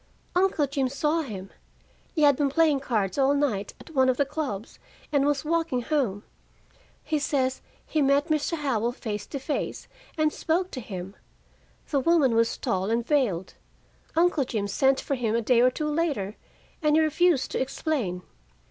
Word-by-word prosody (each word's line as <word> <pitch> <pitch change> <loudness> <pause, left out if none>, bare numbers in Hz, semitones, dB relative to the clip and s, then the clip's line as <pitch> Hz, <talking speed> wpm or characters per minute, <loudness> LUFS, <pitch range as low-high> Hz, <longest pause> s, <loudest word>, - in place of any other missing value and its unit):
"Uncle 360 -5 +3
Jim 275 -1 -1
saw 300 +4 0
him. 195 -9 -7 0.6
He 310 - +2
had 285 -1 +6
been 285 +1 +1
playing 305 -1 +3
cards 220 -4 -1
all 275 +1 +4
night 230 -9 -1
at - - -13
one 260 -2 +4
of 250 - +1
the 285 - +2
clubs, 275 -8 -5 0.3
and 285 -1 +3
was 290 +1 0
walking 325 -6 0
home. 240 -9 -1 0.8
He 310 -1 0
says 265 -3 0 0.2
he 310 - 0
met 280 +2 +3
Mr. 310 +2 0
Howell 245 -5 0
face 210 -5 -5
to 280 - -5
face, 280 +2 -3 0.3
and 310 -1 +2
spoke 355 +3 -1
to 255 - -5
him. 190 -2 -7 0.8
The 285 - +3
woman 285 -3 +3
was 230 0 +2
tall 190 +2 -1
and 230 +1 0
veiled. 230 - 0 0.6
Uncle 335 -3 +3
Jim 215 -5 -2
sent 265 +6 +2
for - - -3
him, 230 -4 0
a - - +3
day 235 +1 +4
or 250 - +6
two 300 +4 -3
later, 285 - -1 0.5
and 300 -1 +3
he - - +5
refused 315 -2 +2
to - - -1
explain. 255 - -2
275 Hz, 175 wpm, -26 LUFS, 230-305 Hz, 0.8 s, had